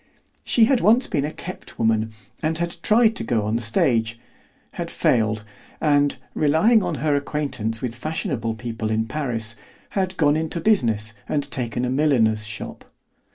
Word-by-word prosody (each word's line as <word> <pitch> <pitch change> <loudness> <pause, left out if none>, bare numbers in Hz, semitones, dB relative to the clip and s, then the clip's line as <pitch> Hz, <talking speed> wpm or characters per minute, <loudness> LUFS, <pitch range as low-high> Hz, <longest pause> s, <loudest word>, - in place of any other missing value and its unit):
She 230 - +4
had 255 0 +2
once 230 +5 +5
been 145 -5 -1
a 150 - -3
kept 185 +3 -9
woman, 110 -1 +1 0.3
and 160 +1 0
had 170 0 -3
tried 225 +2 +4
to - - -1
go 115 -4 0
on 105 +2 -1
the 120 - 0
stage, 115 0 +1 0.5
had - - -5
failed, 110 -2 +1 0.4
and, 145 -2 +3 0.2
relying 160 +10 +4
on 175 -4 -2
her 150 -2 +3
acquaintance 135 -6 -2
with 120 -3 -2
fashionable 120 -4 -3
people 115 -1 -4
in 110 0 0
Paris, 115 -5 -2 0.3
had 190 -2 -2
gone 150 -2 +4
into 160 +2 -1
business 115 - +2 0.2
and 145 -1 0
taken 120 -1 -2
a 125 - -1
milliner's 115 -7 +2
shop. 105 -1 -7
135 Hz, 160 wpm, -23 LUFS, 115-160 Hz, 0.5 s, once